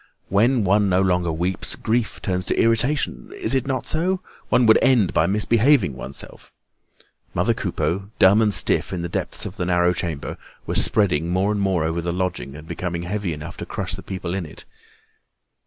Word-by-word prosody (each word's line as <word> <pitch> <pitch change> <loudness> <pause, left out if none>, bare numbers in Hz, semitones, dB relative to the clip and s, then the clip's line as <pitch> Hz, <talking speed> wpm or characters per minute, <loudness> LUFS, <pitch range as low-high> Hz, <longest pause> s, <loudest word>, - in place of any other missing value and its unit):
When 115 +4 +3
one 100 +1 +3
no 90 0 +3
longer 90 -3 +1
weeps, 85 +3 -2
grief 110 -2 -2
turns 90 -2 -2
to - - 0
irritation; 125 +5 +1
is 110 - +1
it 135 -1 0
not 135 -2 -2
so? 180 +4 0 0.3
One 125 - +4
would 110 - +6
end 125 -9 +3
by 80 - +2
misbehaving 110 - +3
oneself. 65 +2 -7 0.8
Mother - - +2
Coupeau, 85 +6 -2
dumb 100 +4 +5
and 105 -2 +3
stiff 95 - +3
in 85 -2 -3
the 85 - -4
depths - - -2
of - - -7
the - - -2
narrow 90 0 +3
chamber, 85 -4 -3 0.3
was - - +4
spreading 85 -6 +1
more 95 +3 +1
and 105 -1 -1
more 95 -4 +1
over 80 +2 -1
the 85 +1 -2
lodging 90 -6 -3
and 75 +2 -11
becoming 85 -1 -4
heavy 100 0 -3
enough 75 -1 -7
to - - -6
crush - - -3
the - - -4
people 90 -2 -5
in 95 -4 -3
it. - - -11
95 Hz, 190 wpm, -22 LUFS, 85-110 Hz, 0.8 s, would